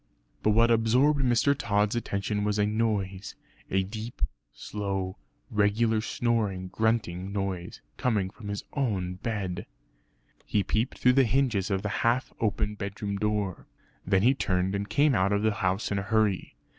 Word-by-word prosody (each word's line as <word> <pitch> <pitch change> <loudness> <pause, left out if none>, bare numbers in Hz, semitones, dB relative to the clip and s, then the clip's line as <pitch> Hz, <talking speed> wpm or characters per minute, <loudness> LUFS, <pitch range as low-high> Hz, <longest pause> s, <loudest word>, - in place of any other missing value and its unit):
But - - +2
what 115 +1 +5
absorbed 125 +6 +3
Mr. 130 +2 +3
Tod's 105 -3 +1
attention 105 -2 -1
was 105 0 0
a 105 - +3
noise 105 -3 -1 0.3
a 95 0 +2
deep 110 - -6 0.3
slow 95 0 -4 0.4
regular 110 +1 +2
snoring 110 -6 -1
grunting 100 -4 0
noise, 95 -3 -3 0.2
coming 105 -7 0
from 105 0 -11
his 100 0 -4
own 95 -10 -1
bed. 95 -4 -3 0.8
He 105 - 0
peeped 110 +5 -1
through 125 - +4
the 135 +1 +5
hinges 120 -6 +1
of 95 -1 -1
the 105 - -1
half 120 +3 +1
open 105 -1 0
bedroom 100 0 -4
door. 105 -3 -1 0.4
Then 95 0 +2
he 130 +4 +6
turned 95 -7 0
and 100 +1 -2
came 145 0 +3
out 100 -3 +2
of 100 +1 +1
the 110 - +3
house 95 +3 0
in 100 - +1
a 100 0 -6
hurry. 110 -4 +1
105 Hz, 155 wpm, -28 LUFS, 95-115 Hz, 0.8 s, he